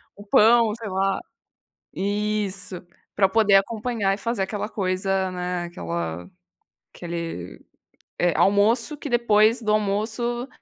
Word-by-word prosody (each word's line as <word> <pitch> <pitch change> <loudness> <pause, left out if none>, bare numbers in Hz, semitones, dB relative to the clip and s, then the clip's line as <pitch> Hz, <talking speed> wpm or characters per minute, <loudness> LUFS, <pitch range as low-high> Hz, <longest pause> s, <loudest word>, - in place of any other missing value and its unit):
O 205 - -13
pão, 225 +1 +5
sei 225 -2 -7
lá. 195 +1 0 0.8
Isso, 200 -2 -2 0.4
pra 195 -1 +4
poder 205 -1 +4
acompanhar 215 -1 0
e 200 - -8
fazer 230 -2 -2
aquela 205 +2 -3
coisa, 190 -1 -1
né, 180 -1 -3
aquela 85 - -5 0.6
aquele, 170 - -6 0.6
eh, 175 -2 +2
almoço 225 +8 +3
que 290 - -6
depois 230 -1 +3
do 215 -1 0
almoço, 225 +4 -1
200 Hz, 120 wpm, -24 LUFS, 185-220 Hz, 0.8 s, pão